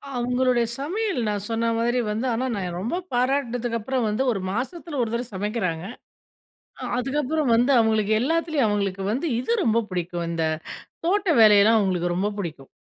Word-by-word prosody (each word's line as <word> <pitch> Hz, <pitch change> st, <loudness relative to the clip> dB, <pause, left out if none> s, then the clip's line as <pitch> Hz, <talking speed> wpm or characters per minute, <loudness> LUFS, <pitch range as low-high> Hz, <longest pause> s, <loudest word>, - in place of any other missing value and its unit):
அவுங்களுடைய 245 Hz, 0 st, +1 dB
சமையல் 380 Hz, -, -1 dB
நான் 205 Hz, -1 st, -2 dB
சொன்னமாரி 230 Hz, +2 st, +1 dB
வந்து 220 Hz, +4 st, -2 dB
ஆனா, 240 Hz, +3 st, -1 dB
நான் 180 Hz, -3 st, -4 dB
ரொம்ப 225 Hz, -, -2 dB, 0.2 s
பாராட்டுனதுக்கு 245 Hz, -2 st, 0 dB
அப்புறம் 250 Hz, +2 st, -1 dB
வந்து 215 Hz, +5 st, 0 dB
1 200 Hz, -, -2 dB
மாசத்தில 285 Hz, -, -4 dB
1 230 Hz, -, 0 dB
தடவ 235 Hz, +2 st, -1 dB
சமைக்கிறாங்க. 190 Hz, -5 st, -2 dB, 1.0 s
அ -, -, -5 dB
அதுக்கப்பறம் 275 Hz, +1 st, 0 dB
வந்து 245 Hz, +4 st, +3 dB
அவுங்களுக்கு 220 Hz, -2 st, +2 dB
எல்லாத்துலயும் 315 Hz, -1 st, +1 dB
அவங்களுக்கு 200 Hz, -2 st, -1 dB
வந்து 270 Hz, +9 st, -1 dB
இது 255 Hz, -, -2 dB
ரொம்ப 225 Hz, 0 st, +2 dB
பிடிக்கும். 175 Hz, -1 st, -3 dB
இந்த 165 Hz, -1 st, -1 dB, 0.6 s
தோட்ட 395 Hz, +2 st, +1 dB
வேலையெல்லாம் 215 Hz, +1 st, +7 dB
அவுங்களுக்கு 180 Hz, -3 st, 0 dB
ரொம்ப 195 Hz, +3 st, 0 dB
பிடிக்கும். 155 Hz, -8 st, -6 dB
230 Hz, 150 wpm, -24 LUFS, 205-260 Hz, 1.0 s, வேலையெல்லாம்